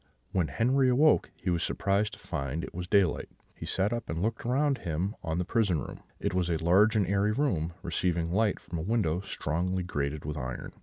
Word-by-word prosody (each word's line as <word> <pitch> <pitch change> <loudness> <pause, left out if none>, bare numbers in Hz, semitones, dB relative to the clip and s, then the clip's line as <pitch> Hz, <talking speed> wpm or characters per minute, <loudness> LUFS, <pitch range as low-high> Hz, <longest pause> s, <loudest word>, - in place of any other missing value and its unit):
"When 90 -4 +1
Henri 130 - +2
awoke, 145 +5 +4
he 90 - +1
was 85 -1 +1
surprised 100 +1 0
to - - -8
find 75 0 -4
it - - -7
was 90 0 -5
daylight; 95 -5 +2 0.2
he - - -8
sat 95 +4 +1
up 120 -1 -4
and 80 - -2
looked 115 +5 -2
around 135 +1 +2
him 85 +5 -2
on 80 0 -2
the 90 - 0
prison 100 -6 +1
room; - - -7 0.2
it - - -1
was 90 -1 +1
a 85 - +1
large 95 +7 +4
and 105 -3 +3
airy 100 +3 +2
room, 90 - 0
receiving 85 -1 0
light 105 +1 +2
from 85 - -6
a - - -2
window 90 -4 +1
strongly 90 0 -2
grated 75 -3 -3
with 75 0 -3
iron. 65 -2 -5
90 Hz, 210 wpm, -29 LUFS, 80-110 Hz, 0.2 s, awoke